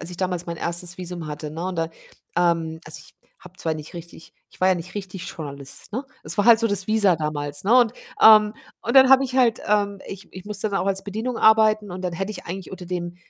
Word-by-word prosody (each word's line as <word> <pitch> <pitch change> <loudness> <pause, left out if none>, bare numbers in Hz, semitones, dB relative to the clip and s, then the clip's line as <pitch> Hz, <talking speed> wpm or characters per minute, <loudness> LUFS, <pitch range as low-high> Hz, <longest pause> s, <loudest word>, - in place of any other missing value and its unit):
als 170 - -6
ich 175 - -8
damals 180 -1 -2
mein 170 0 -5
1. 175 +2 -3
Visum 175 -2 -6
hatte, 150 0 -6
ne, 165 +3 -5
und 185 -1 -4
da, 165 -1 -1 0.5
ähm 165 -2 0
also, 155 -2 -8
ich 155 - -16 0.2
habe 185 0 -16
zwar 160 -1 -1
nicht 155 +2 -9
richtig 170 -1 -11 0.2
ich - - -20
war 185 - +5
ja 185 - +4
nicht 175 +1 -8
richtig 190 -3 -6
Journalist, 140 +3 -8
ne? 255 +5 -3 0.2
Es - - -4
war 205 - +2
halt 230 -1 +8
so 230 - +2
das 200 -3 0
Visa 210 -5 +3
damals, 145 -1 -3
ne? 235 +6 +5
Und, 235 -2 +3 0.3
ähm 215 -1 +8 0.3
und 235 - -1
dann 265 0 +8
habe 270 0 +7
ich 255 0 -4
halt, 245 -4 +3
ähm 205 -1 +1
ich 195 0 -10
ich 185 0 -10
musste 210 0 -2
dann 195 - 0
auch - - -2
als 195 0 0
Bedienung 220 +5 -4
arbeiten 215 -2 +4
und 180 +1 -6
dann 180 -2 -3
hätte 195 +4 -3
ich 200 - -9
eigentlich 185 +2 -6
unter 185 -1 -9
dem, 175 -1 -4
185 Hz, 250 wpm, -23 LUFS, 170-210 Hz, 0.5 s, halt